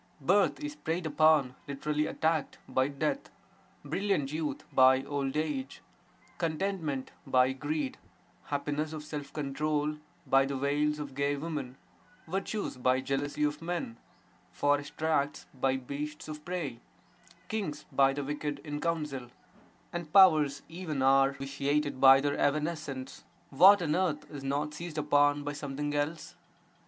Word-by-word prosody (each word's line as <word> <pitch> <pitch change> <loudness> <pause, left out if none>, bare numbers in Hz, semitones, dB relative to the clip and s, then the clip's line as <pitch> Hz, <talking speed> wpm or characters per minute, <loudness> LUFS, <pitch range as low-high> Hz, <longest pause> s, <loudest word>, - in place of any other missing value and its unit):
Birth 190 +8 +3
is 295 0 -4
preyed 165 - -3
upon 155 -3 +4
(lit. 140 0 -7
attacked) 155 +1 0
by 130 0 +1
death; 150 - -2 0.6
brilliant 175 -9 -1
youth 155 -1 -3
by 130 0 +6
old 140 0 -2
age; 150 -4 -3 0.6
contentment 160 -4 -2 0.2
by 130 0 +4
greed; 145 0 -3 0.5
happiness 150 +2 -2
of 155 -1 -6
self 150 -2 -6
control 150 +1 -1 0.3
by 135 0 +5
the 140 -1 -2
wiles 145 +2 +1
of 145 -2 -6
gay 140 +1 0
women; 140 -4 -5 0.5
virtues 195 0 -3
by 130 +1 +2
jealousy 145 +2 -2
of 150 +1 0
men; 165 -8 -3 0.6
forest 145 0 0
tracts 155 -2 0
by 135 0 +1
beasts 145 +3 -6
of 150 -1 -7
prey; 160 -9 -4 0.7
kings 180 -9 -3
by 135 -1 +4
the 140 +1 -3
wicked 145 +1 -3
(in 145 -1 -4
counsel); 150 -7 -2 0.6
and 170 -3 -5
powers 155 -7 +6
even 160 -5 -3
are 135 +1 +5
vitiated 140 +1 -1
by 135 0 +9
their 145 +1 -1
evanescence; 150 -3 -2 0.3
what 185 +7 +7
on 155 -1 +1
earth 175 -5 0
is 145 -2 -7
not 145 +2 -1
seized 165 0 -7
upon 145 -1 +3
by 145 0 -3
something 145 0 -4
else? 145 +3 -2
145 Hz, 135 wpm, -30 LUFS, 140-155 Hz, 0.7 s, by